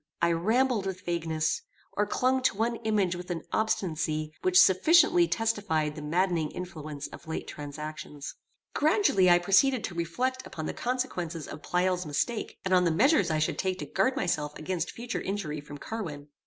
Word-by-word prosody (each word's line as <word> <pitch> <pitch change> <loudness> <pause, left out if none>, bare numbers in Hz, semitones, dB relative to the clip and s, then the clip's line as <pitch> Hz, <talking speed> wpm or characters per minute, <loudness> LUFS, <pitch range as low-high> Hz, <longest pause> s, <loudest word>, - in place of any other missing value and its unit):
I 170 0 +3
rambled 220 +5 +1
with 185 -1 -4
vagueness, 165 - -1 0.3
or 210 0 0
clung 260 +4 +1
to 225 - +1
one 230 +2 0
image 210 -6 0
with 180 +1 -8
an 175 -2 -3
obstinacy 155 -7 -1
which 370 0 +5
sufficiently 330 - +6
testified 205 - 0
the 150 - -7
maddening 165 0 0
influence 155 -5 -7
of - - -12
late 160 - -4
transactions. 150 0 -7 0.4
Gradually 300 - +3
I 175 - +7
proceeded 205 +7 +3
to - - -4
reflect 245 +11 -2
upon 155 - -6
the - - -3
consequences 180 - -3
of - - -8
Pleyel's 180 -1 0
mistake, 215 +11 -2
and 185 - +1
on 180 -1 +5
the - - +3
measures 270 - +3
I 155 - +1
should 155 - -1
take 185 -1 0
to - - -5
guard 260 0 +1
myself 150 - -1
against 175 +1 -3
future 240 +1 -5
injury 175 -7 -3
from 145 0 -10
Carwin. 150 -7 -6
180 Hz, 170 wpm, -28 LUFS, 155-225 Hz, 0.4 s, I